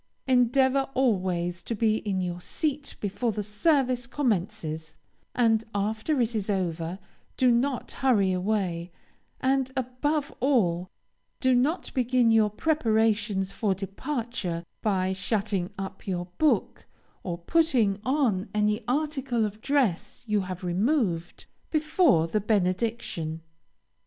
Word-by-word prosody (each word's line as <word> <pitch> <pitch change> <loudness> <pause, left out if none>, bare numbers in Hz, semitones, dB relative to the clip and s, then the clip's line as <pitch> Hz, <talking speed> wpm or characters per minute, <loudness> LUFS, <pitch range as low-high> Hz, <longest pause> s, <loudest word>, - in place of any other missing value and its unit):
Endeavor 260 +2 +3
always 185 -8 0
to 230 - -4
be 220 0 +2
in 195 -4 -2
your 175 -1 -3
seat 295 - -3
before 220 +4 -1
the 210 0 -3
service 250 +3 +1
commences, 195 - -2 0.4
and 225 -2 +3
after 220 +8 0
it 235 -1 +1
is 215 -2 -2
over 175 -3 -1 0.4
do 255 -1 +4
not 250 +2 0
hurry 215 -8 +2
away, 180 -3 -1 0.5
and, 265 0 +1
above 275 +4 -1
all, 185 -10 +2 0.5
do 260 -1 +3
not 275 +8 +1
begin 250 -2 +3
your 220 -1 +4
preparations 220 -7 +1
for 200 -3 0
departure, 200 - -4 0.2
by 190 -3 +1
shutting 195 -1 -1
up 195 0 -7
your 180 -2 -2
book, 310 -1 +1 0.3
or 175 -2 -4
putting 230 - +2
on 245 -8 +1
any 210 +2 +1
article 270 -4 0
of 210 +1 -6
dress 260 -12 0
you 210 -2 +1
have 185 -1 -6
removed, 180 - 0 0.2
before 305 - +3
the 210 +6 -1
benediction. 185 -5 -1
220 Hz, 120 wpm, -27 LUFS, 185-255 Hz, 0.5 s, do